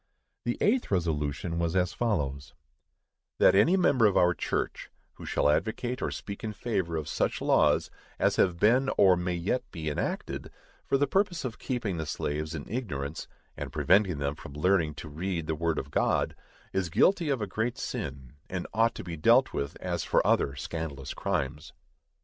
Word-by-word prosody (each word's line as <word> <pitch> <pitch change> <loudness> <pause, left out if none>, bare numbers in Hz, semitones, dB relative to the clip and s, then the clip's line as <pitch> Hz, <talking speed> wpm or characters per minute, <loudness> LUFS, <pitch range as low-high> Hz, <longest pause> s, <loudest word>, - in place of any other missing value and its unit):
The 120 - -1
eighth 240 +4 +2
resolution 80 -1 -1
was 85 +1 0
as 90 -1 +1
follows: 70 - -2 0.8
That - - +6
any 160 - +5
member 130 - +4
of 100 - +1
our 90 0 +5
church, - - -3 0.2
who - - -10
shall - - +1
advocate 120 - 0
or - - 0
speak 100 +2 -7
in 110 -1 -3
favor 95 -8 -2
of 75 - -4
such - - 0
laws - - +3 0.3
as - - +2
have 90 -2 +3
been 125 +7 +4
or 95 -2 +6
may 90 0 -2
yet 95 +9 0
be 80 -3 -4
enacted, - - -3 0.4
for - - +3
the 145 - +3
purpose 180 +1 0
of 115 -3 -5
keeping 115 -9 -2
the 80 -1 -3
slaves 75 +3 -3
in 75 - -6
ignorance, 80 - -4 0.3
and - - -6
preventing 95 -3 +3
them 70 0 -1
from 70 -1 -11
learning 80 0 +2
to 80 - -8
read 85 +2 -3
the 80 - -1
word 80 0 -1
of 70 - -4
God, - - +1 0.4
is 95 -2 0
guilty 170 - +3
of 135 -3 +1
a 105 - -1
great 110 +5 -2
sin, 65 -2 -5 0.2
and 90 -2 -3
ought 115 +1 +3
to - - -6
be 85 -2 -5
dealt 75 - +4
with 70 0 -3
as - - -2
for - - +2
other 70 - +2
scandalous 70 -2 -5
crimes. 65 -2 -3
90 Hz, 180 wpm, -29 LUFS, 75-115 Hz, 0.8 s, That